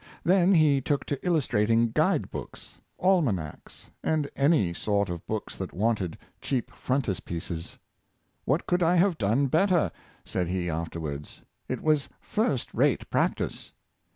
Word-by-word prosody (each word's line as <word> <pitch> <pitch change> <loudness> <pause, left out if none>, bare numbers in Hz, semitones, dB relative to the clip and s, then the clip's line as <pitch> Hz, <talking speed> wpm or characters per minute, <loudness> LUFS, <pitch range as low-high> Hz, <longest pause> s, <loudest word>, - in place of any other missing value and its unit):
Then 185 +1 +4
he 150 -4 +4
took 140 +2 -1
to 140 -2 -4
illustrating 115 - +2
guide - - +1
books, - - -9 0.2
almanacs, 130 - -1
and 155 -2 +1
any 140 - +3
sort 100 0 0
of 85 -1 -5
books 110 -1 -3
that 95 - -5
wanted 100 -4 0 0.2
cheap 130 -4 -2
frontispieces. 90 -9 -3 0.7
"What 140 +6 0
could 180 0 +1
I 170 +1 +4
have 180 -1 +3
done 115 +7 +2
better.^" 165 - +3 0.3
said 90 -2 -1
he 90 -1 -1
afterwards; 80 -3 -5 0.3
"it - - -3
was 155 -2 +2
first 175 - -1
rate - - +1
practice." - - -1
125 Hz, 130 wpm, -27 LUFS, -, 0.7 s, Then